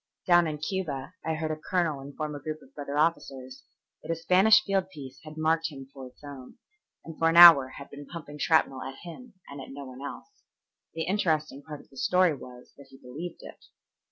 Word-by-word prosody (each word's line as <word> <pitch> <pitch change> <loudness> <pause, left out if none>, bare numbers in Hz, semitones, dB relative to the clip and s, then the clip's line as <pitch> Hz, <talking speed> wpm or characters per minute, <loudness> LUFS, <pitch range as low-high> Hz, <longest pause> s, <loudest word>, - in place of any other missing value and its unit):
Down 175 -2 +5
in 155 -1 -4
Cuba 155 -3 -4
I 160 - -1
heard 155 0 -3
a - - -1
colonel 155 -2 -1
inform 145 +2 -6
a 145 - -6
group 155 +2 -6
of 135 - -21
brother 145 0 -5
officers 135 -5 -2 0.4
that - - -13
a - - 0
Spanish 190 +6 +5
field 195 -2 -1
piece 135 -6 -11
had 155 0 -11
marked 160 +1 +1
him 135 -1 -11
for 135 -2 -9
its 125 - -20
own, 140 -3 -11 0.5
and 165 -1 -10
for 165 - +3
an 165 - +1
hour 165 -6 +10
had 140 - -11
been 145 0 -10
pumping 150 -4 -9
shrapnel 140 -4 +2
at 135 - -7
him 210 +6 -11
and 140 0 -9
at - - -10
no 140 +1 -8
one 130 0 -11
else. 410 - -9 0.5
The 165 - -2
interesting 160 -6 -1
part 150 0 -9
of - - -24
the 135 - -17
story 180 +3 +3
was 125 -2 -12
that 140 - -15
he 135 - -16
believed 155 +8 -8
it. - - -13
155 Hz, 215 wpm, -27 LUFS, 140-170 Hz, 0.5 s, hour